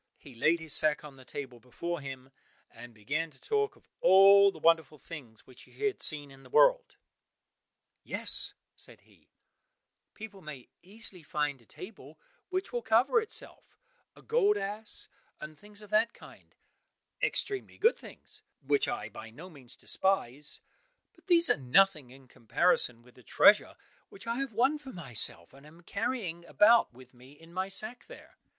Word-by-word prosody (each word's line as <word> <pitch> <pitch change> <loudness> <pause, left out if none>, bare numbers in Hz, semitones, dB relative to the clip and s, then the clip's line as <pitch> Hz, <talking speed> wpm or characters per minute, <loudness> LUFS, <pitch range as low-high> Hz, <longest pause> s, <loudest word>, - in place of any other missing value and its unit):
He 140 - -15
laid 155 +8 +2
his 160 -2 -2
sack 155 -1 +3
on 145 -2 -11
the 130 - -15
table 130 -2 -8
before 165 +8 -5
him, 135 -1 -9 0.4
and 120 +1 -12
began 140 +10 -3
to 135 - -18
talk 425 0 -1
of - - -26
all 195 +1 +7
the 175 - -13
wonderful 160 -2 +2
things 135 -8 -11
which 130 - -17
he 425 - -7
had 410 - -1
seen 145 -2 +1
in 135 0 -15
the - - -17
world. - - +3 1.1
"Yes," - - +1 0.2
said - - -8
he, - - -27 0.9
"people 210 -3 -10
may 150 -6 -10
easily 195 -1 -2
find 150 -5 -3
a 115 - -25
table 160 -7 -12 0.3
which 370 -3 -3
will 240 - -1
cover 235 - +3
itself, 440 - -6 0.4
a - - -18
gold 430 -3 +2
ass, 210 +2 -1 0.3
and 150 0 -9
things 205 +5 -9
of 210 - -15
that 215 +2 +2
kind—extremely 415 -5 -6
good 455 +3 +4
things - - -15 0.2
which 420 -2 +2
I 240 0 -3
by 115 - -10
no 165 +11 -12
means 135 -6 -15
despise—but 190 - -4
these 340 -2 +4
are - - +3
nothing 145 +2 +3
in 130 +1 -16
comparison 125 -1 +1
with 125 0 -20
the 125 - -18
treasure 115 - +4 0.3
which 195 - -13
I 230 +1 -2
have 275 -3 -3
won 265 +7 +2
for 275 -3 -10
myself, 120 - -2
and 135 +1 -16
am 160 +3 -16
carrying 195 -3 -4
about 225 +6 +4
with 130 +1 -17
me 130 +3 -17
in 165 +3 -18
my 185 +1 -2
sack 215 +5 -3
there." - - -14
170 Hz, 165 wpm, -30 LUFS, 135-225 Hz, 1.1 s, all